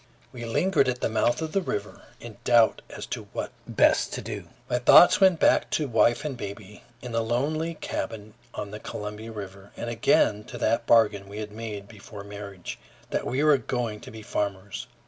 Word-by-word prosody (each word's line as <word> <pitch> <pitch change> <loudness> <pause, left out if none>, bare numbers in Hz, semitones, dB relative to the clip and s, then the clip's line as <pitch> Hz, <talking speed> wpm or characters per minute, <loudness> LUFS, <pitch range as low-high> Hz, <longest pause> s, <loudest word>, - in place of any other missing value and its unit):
We 120 -1 -7
lingered 145 +5 +2
at 125 -1 -2
the - - 0
mouth 120 +6 +1
of 160 - -4
the 195 - +1
river 105 - -4 0.2
in 120 -2 -10
doubt 120 -2 +4
as - - -7
to - - -6
what - - -4 0.2
best - - +3
to - - -3
do. - - -6 0.2
My 125 - 0
thoughts 175 +10 +7
went 185 -4 +5
back - - +4
to 150 - -2
wife 120 +2 +3
and 145 -3 -3
baby 100 -2 -8 0.2
in 125 - -6
the 115 0 +1
lonely 150 +8 -1
cabin 110 -7 -5 0.2
on 100 - -6
the 105 - -7
Columbia 105 +2 -6
River, 100 -2 -9
and 120 - -4
again 105 -1 +3
to - - -8
that 115 +1 0
bargain 105 -4 +4
we 100 - -8
had 105 -1 -5
made 105 -2 -6
before 105 -1 -11
marriage, 100 -3 -8 0.3
that - - -1
we 135 +4 0
were 150 -3 +5
going 120 -5 -3
to - - -11
be 110 0 -10
farmers. 100 -2 -3
110 Hz, 195 wpm, -26 LUFS, 105-125 Hz, 0.3 s, thoughts